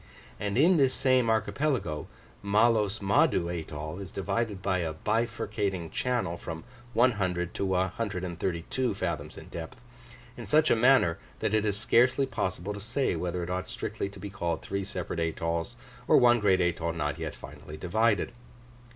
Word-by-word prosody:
And 100 Hz, +1 st, -2 dB
in 170 Hz, +6 st, +5 dB
this 135 Hz, -3 st, +3 dB
same 130 Hz, -3 st, +3 dB
archipelago, 110 Hz, -, 0 dB, 0.3 s
Mahlos 105 Hz, 0 st, +2 dB
Mahdoo 95 Hz, -3 st, +3 dB
atoll 80 Hz, 0 st, -5 dB
is 95 Hz, -2 st, -7 dB
divided 100 Hz, +1 st, -2 dB
by 95 Hz, -1 st, 0 dB
a 80 Hz, -2 st, -2 dB
bifurcating 105 Hz, -4 st, -1 dB
channel 120 Hz, -10 st, -1 dB
from 80 Hz, -1 st, -7 dB, 0.3 s
100 95 Hz, -8 st, +1 dB
to -, -, -2 dB
132 95 Hz, +2 st, -1 dB
fathoms 75 Hz, -6 st, -3 dB
in -, -, -10 dB
depth, 85 Hz, +10 st, -7 dB, 0.6 s
in 120 Hz, -, -8 dB
such 155 Hz, +1 st, +4 dB
a -, -, +6 dB
manner, 120 Hz, -8 st, +4 dB, 0.2 s
that -, -, -1 dB
it 110 Hz, -1 st, +3 dB
is 100 Hz, -1 st, +1 dB
scarcely 125 Hz, +4 st, +3 dB
possible 95 Hz, -6 st, -3 dB
to 105 Hz, -, -7 dB
say 115 Hz, +6 st, 0 dB
whether 90 Hz, 0 st, -2 dB
it 85 Hz, -, -4 dB
ought 90 Hz, 0 st, -2 dB
strictly 100 Hz, -, -4 dB
to 100 Hz, -, -12 dB
be 100 Hz, -, -6 dB
called 85 Hz, -4 st, -2 dB
three 100 Hz, 0 st, -2 dB
separate 90 Hz, -3 st, -4 dB
atolls, 85 Hz, 0 st, -2 dB, 0.3 s
or -, -, +6 dB
one 120 Hz, -1 st, +6 dB
great 95 Hz, -3 st, +3 dB
atoll 85 Hz, -1 st, 0 dB
not 75 Hz, -1 st, -2 dB
yet 80 Hz, -2 st, -4 dB
finally 75 Hz, -, -10 dB
divided. 105 Hz, +8 st, +1 dB
100 Hz, 160 wpm, -29 LUFS, 85-115 Hz, 0.6 s, a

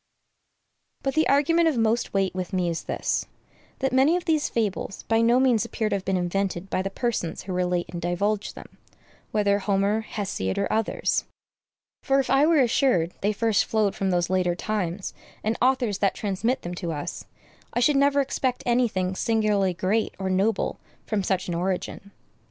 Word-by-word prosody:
But 270 Hz, -, 0 dB
the 315 Hz, 0 st, +2 dB
argument 325 Hz, +4 st, +4 dB
of 305 Hz, -6 st, +1 dB
most 230 Hz, +1 st, +1 dB
weight 195 Hz, -1 st, 0 dB
with 185 Hz, +1 st, -5 dB
me 180 Hz, -2 st, +1 dB
is 165 Hz, -, -4 dB
this, -, -, -1 dB, 0.5 s
that 270 Hz, -1 st, -1 dB
many 270 Hz, +6 st, +4 dB
of 360 Hz, -, -6 dB
these 315 Hz, -3 st, +1 dB
fables 205 Hz, -3 st, -2 dB
by 225 Hz, 0 st, +2 dB
no 235 Hz, +2 st, +4 dB
means 250 Hz, -4 st, +3 dB
appear 225 Hz, -2 st, -2 dB
to 205 Hz, -, 0 dB
have 195 Hz, -, -4 dB
been 190 Hz, -1 st, +1 dB
invented 185 Hz, +1 st, -2 dB
by -, -, +1 dB
the 195 Hz, -, -2 dB
persons 205 Hz, -6 st, -2 dB
who 185 Hz, -, -5 dB
relate 180 Hz, -1 st, 0 dB
and 175 Hz, -, -6 dB
divulge 200 Hz, +4 st, -1 dB
them, -, -, -13 dB, 0.5 s
whether 205 Hz, -1 st, +2 dB
Homer, 200 Hz, +1 st, +1 dB
Hesiod, 195 Hz, -, -3 dB
or 200 Hz, -, 0 dB
others; 220 Hz, -1 st, 0 dB, 0.8 s
for 270 Hz, -1 st, +2 dB
if 265 Hz, -, -1 dB
I 275 Hz, +3 st, +5 dB
were 320 Hz, -4 st, +5 dB
assured 235 Hz, -, +2 dB
they 205 Hz, -, +2 dB
first 220 Hz, 0 st, +1 dB
flowed 215 Hz, -3 st, +1 dB
from 195 Hz, -, -1 dB
those 175 Hz, -1 st, +1 dB
later 180 Hz, -1 st, +1 dB
times 190 Hz, -2 st, -3 dB, 0.3 s
and 220 Hz, +2 st, 0 dB
authors 245 Hz, -5 st, +2 dB
that 195 Hz, -, +1 dB
transmit 220 Hz, +6 st, -1 dB
them 175 Hz, -, -5 dB
to 170 Hz, -, -2 dB
us, 155 Hz, +3 st, -5 dB, 0.5 s
I -, -, +1 dB
should 280 Hz, +4 st, +3 dB
never 280 Hz, +1 st, +4 dB
expect 260 Hz, -2 st, -2 dB
any 245 Hz, 0 st, +3 dB
thing 185 Hz, -3 st, -2 dB
singularly 210 Hz, -3 st, +1 dB
great 205 Hz, +6 st, 0 dB
or 190 Hz, -1 st, -2 dB
noble 195 Hz, +3 st, 0 dB, 0.3 s
from 215 Hz, -2 st, -1 dB
such 190 Hz, -1 st, -1 dB
an 175 Hz, -, -2 dB
origin. 185 Hz, +3 st, -3 dB
205 Hz, 185 wpm, -25 LUFS, 185-240 Hz, 0.8 s, I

